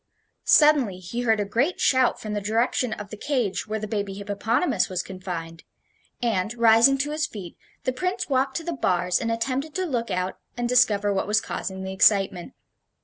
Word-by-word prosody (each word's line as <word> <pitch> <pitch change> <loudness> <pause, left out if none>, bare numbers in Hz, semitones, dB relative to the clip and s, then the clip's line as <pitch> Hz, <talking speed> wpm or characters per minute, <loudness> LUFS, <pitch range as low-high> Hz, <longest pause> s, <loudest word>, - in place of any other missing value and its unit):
Suddenly 290 - +5
he 185 +7 -5
heard 225 -3 +2
a 205 - 0
great 255 - 0
shout 260 -2 +3
from 215 -1 -5
the 205 - -2
direction 230 +3 0
of 210 -2 -7
the - - -5
cage 245 -6 -1
where 215 +1 -2
the 215 - -4
baby 200 -2 -3
hippopotamus 205 - 0
was 185 -2 -2
confined, 170 -3 -7 0.6
and, 220 -1 0
rising 235 +3 +5
to 290 +2 -2
his 305 0 -1
feet, 190 -6 -9 0.3
the 255 - -1
Prince 365 +8 -2
walked 265 -1 0
to 330 - -5
the 340 +1 -3
bars 180 - +1
and 230 0 -1
attempted 260 +6 -2
to 375 - -1
look 240 -8 -2
out 185 0 -2 0.2
and 240 0 -1
discover 210 -5 +3
what 195 - -1
was 210 +1 +3
causing 190 -3 -5
the 190 0 -5
excitement. 190 -2 +2
220 Hz, 190 wpm, -24 LUFS, 195-255 Hz, 0.6 s, Suddenly